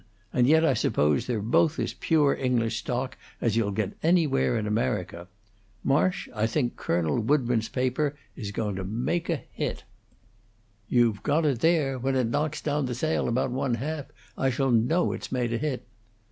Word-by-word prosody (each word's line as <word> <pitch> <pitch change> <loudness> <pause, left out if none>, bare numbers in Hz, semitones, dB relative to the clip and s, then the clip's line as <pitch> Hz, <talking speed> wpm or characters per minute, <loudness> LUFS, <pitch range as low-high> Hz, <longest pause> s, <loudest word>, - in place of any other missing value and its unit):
And 125 -1 +3
yet 160 +3 +5
I - - +4
suppose 75 -1 +1
they're 115 -5 -1
both 150 +8 +2
as - - -2
pure 150 -4 +2
English 120 -3 0
stock 125 +1 -3 0.2
as 115 -3 +1
you'll 115 -3 +1
get 100 0 -2
anywhere 160 -8 +2
in 110 - -2
America. 105 -6 -2 0.6
Marsh, 165 +7 +1
I 110 -1 +1
think 120 +1 -1
Colonel 85 0 0
Woodburn's 120 -2 +1
paper 130 +3 0 0.2
is 105 -5 -5
going 105 -1 -3
to 95 - -3
make 120 - -2
a 165 - +2 0.2
hit." - - -3 1.1
"You've 115 -5 +3
got 150 +3 +1 0.2
there! 150 -5 +2
When 135 +2 0
it 125 -3 +1
knocks 150 +3 -1
down 145 -2 0
the 125 - -3
sale 155 +6 0
about 125 +2 0
one 130 -1 0
half, 145 +4 -4 0.3
I 135 - +1
shall 130 +1 0
know 125 +10 +2
it's - - -6
made 120 -2 0
a 115 - -1
hit." 150 -4 -3
125 Hz, 175 wpm, -27 LUFS, 115-145 Hz, 1.1 s, yet